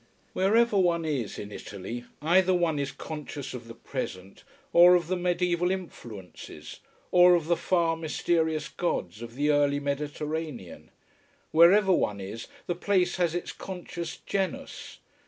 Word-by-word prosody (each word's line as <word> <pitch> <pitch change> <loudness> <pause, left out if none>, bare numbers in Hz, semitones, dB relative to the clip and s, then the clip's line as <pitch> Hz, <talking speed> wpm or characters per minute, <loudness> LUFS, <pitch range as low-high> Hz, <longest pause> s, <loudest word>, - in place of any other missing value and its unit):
Wherever 210 +2 +3
one 170 -3 +2
is 135 -9 -2
in 105 - -7
Italy, 105 +5 -7 0.2
either 185 +3 +4
one 165 -4 +1
is 140 -1 -2
conscious 150 -3 -7
of 120 -2 -8
the 115 - -10
present, 100 -7 -6 0.3
or 175 +1 +8
of 175 -2 +1
the 185 +3 -1
mediaeval 180 0 +1
influences, 120 - -7 0.3
or 180 0 +7
of 170 -3 0
the 170 +1 +2
far, 170 -2 +1
mysterious 160 -1 0
gods 105 - -3
of 120 0 -8
the 145 +2 +2
early 145 -1 +2
Mediterranean. 145 - -4 0.6
Wherever 190 +5 +6
one 105 - 0
is, 100 +4 -7 0.2
the 175 - -1
place 185 +1 +1
has 175 -2 +1
its 175 - -3
conscious 175 -2 -7
genus. 200 +8 -4
165 Hz, 140 wpm, -27 LUFS, 140-180 Hz, 0.6 s, or